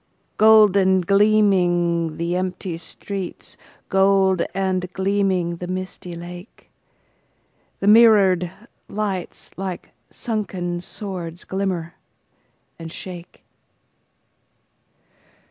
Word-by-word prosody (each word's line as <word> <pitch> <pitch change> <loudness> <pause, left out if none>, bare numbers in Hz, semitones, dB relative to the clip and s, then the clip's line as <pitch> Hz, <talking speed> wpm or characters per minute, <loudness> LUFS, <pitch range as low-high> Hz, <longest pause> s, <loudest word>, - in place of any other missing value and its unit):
Gold 215 -2 +6
and 190 -2 +3
gleaming 180 -5 +2
the 170 +1 -2
empty 185 -1 -3
streets, 190 +2 -6 0.3
Gold 190 -2 +3
and 185 -2 -1
gleaming 190 -3 0
the 180 - -6
misty 185 -1 -5
lake, 175 +4 -11 1.1
The 195 - -1
mirrored 205 -6 +5 0.4
lights 200 -3 -4
like 190 -2 -6 0.2
sunken 185 -6 -3
swords, 180 -3 -5
Glimmer 185 -4 -3 0.9
and 165 -1 -8
shake. 175 0 -10
185 Hz, 80 wpm, -22 LUFS, 175-195 Hz, 1.1 s, Gold